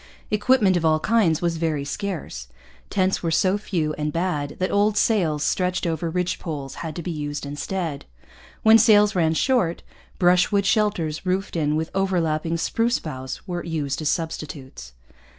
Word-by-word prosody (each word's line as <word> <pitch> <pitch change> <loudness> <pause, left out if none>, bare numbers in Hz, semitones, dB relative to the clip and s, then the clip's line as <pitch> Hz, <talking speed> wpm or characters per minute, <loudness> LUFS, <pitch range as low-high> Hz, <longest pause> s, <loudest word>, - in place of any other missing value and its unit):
Equipment 210 -2 +3
of 175 - 0
all 155 -1 +3
kinds 185 -5 +2
was 170 -1 0
very 155 -4 -1
scarce. 145 - -5 0.4
Tents 190 -1 +1
were 170 - -1
so 185 +4 +2
few 165 -7 -2
and 150 0 -1
bad 160 -4 -2
that 185 - -1
old 205 +1 +2
sails 170 -10 +2
stretched 180 +3 0
over 165 0 -1
ridge 180 +1 -1
poles 145 -5 -5
had 160 -2 -5
to 170 - -5
be 175 - -3
used 145 -2 -4
instead. 145 +2 -4 0.6
When 220 +1 +7
sails 210 -1 +5
ran 160 -3 +2
short, 225 -7 +1 0.3
brushwood 180 +3 +3
shelters 200 -7 0
roofed 190 +1 -2
in 150 -2 +1
with 160 +1 -2
overlapping 170 -4 0
spruce 230 +8 +1
boughs 130 +1 -7
were 175 -1 -3
used 155 -4 -3
as 150 - 0
substitutes. 145 - -5
170 Hz, 160 wpm, -23 LUFS, 155-195 Hz, 0.6 s, When